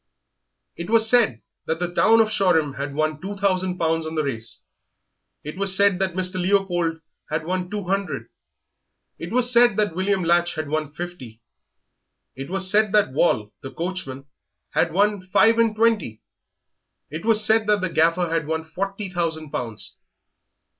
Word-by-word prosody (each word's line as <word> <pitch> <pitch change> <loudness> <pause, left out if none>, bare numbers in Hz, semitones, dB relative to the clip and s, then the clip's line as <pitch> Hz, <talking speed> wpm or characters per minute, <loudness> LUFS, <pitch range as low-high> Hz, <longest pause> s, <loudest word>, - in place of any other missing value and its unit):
It 170 +3 -7
was 225 0 +4
said 225 - +2 0.2
that 160 - -1
the 175 0 -4
town 225 +4 +4
of 215 -1 0
Shoreham 160 -9 +1
had 140 0 -5
won 155 0 -1
two 200 +2 -6
thousand 185 -2 -1
pounds 165 -1 -1
on 160 - -6
the 155 - 0
race; 115 -5 -5 0.8
it 150 +4 -8
was 195 -1 +3
said 200 -2 +3
that 190 -2 -1
Mr. 185 0 -1
Leopold 175 -4 0 0.3
had 155 +1 -3
won 180 +1 -3
two 210 0 -4
hundred; 195 +1 -3 0.9
it - - -7
was 245 +1 +2
said 240 -3 +5
that 210 -5 0
William 190 +1 0
Latch 175 +1 +1
had 155 -2 -4
won 155 -1 -2
fifty; 150 -9 -8 1.0
it 135 +3 -7
was 190 0 +4
said 210 +1 +3
that 210 -9 +3
Wall, 110 -8 +1
the 135 - -7
coachman, 165 -6 -6 0.5
had 165 - +1
won 200 +1 0
five 225 +5 +3
and 225 -2 +2
twenty; 215 - 0 0.9
it 155 +2 -6
was 220 -2 +3
said 220 0 +3
that 210 -2 +2
the 185 - -1
Gaffer 165 +2 +2
had 165 -2 -2
won 160 0 -3
forty 195 +5 -5
thousand 165 -4 -3
pounds. 115 -3 -6
180 Hz, 165 wpm, -22 LUFS, 160-200 Hz, 1.0 s, said